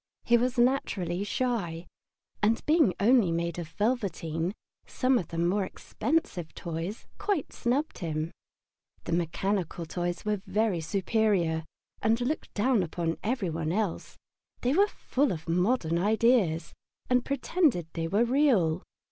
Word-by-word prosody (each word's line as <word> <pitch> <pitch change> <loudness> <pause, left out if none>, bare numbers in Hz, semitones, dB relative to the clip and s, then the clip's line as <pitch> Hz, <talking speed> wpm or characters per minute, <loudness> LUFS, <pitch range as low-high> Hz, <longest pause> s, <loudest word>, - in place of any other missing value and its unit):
He 240 - +4
was 245 +2 +1
naturally 200 -8 +1
shy, 205 -8 -2 0.6
and 220 +2 +2
being 310 - +4
only 220 -3 +4
made 170 0 -1
of 170 - -5
velveteen, 175 -3 -1 0.3
some 255 -1 +2
of 170 - -5
the 165 - -6
more 180 +4 +2
expensive 185 - -2
toys 170 +5 -5
quite 405 -8 -1
snubbed 265 +6 -1
him. 160 -1 -2 0.7
The - - -5
mechanical 175 +1 -1
toys 175 +3 -3
were 210 -2 0
very 200 -3 +1
superior, 185 -3 +1 0.4
and 225 +1 +2
looked 255 +6 -2
down 235 +1 +3
upon 165 -1 -2
every 220 -6 -1
one 160 0 -2
else; 205 -1 -2 0.4
they 250 +2 +1
were 400 +6 +5
full 285 - 0
of 160 -2 -5
modern 175 -1 +1
ideas, 210 -4 +2 0.3
and 250 -1 +3
pretended 280 - +1
they 165 -1 -2
were 205 +7 +2
real. 230 - +3
200 Hz, 135 wpm, -28 LUFS, 170-245 Hz, 0.7 s, were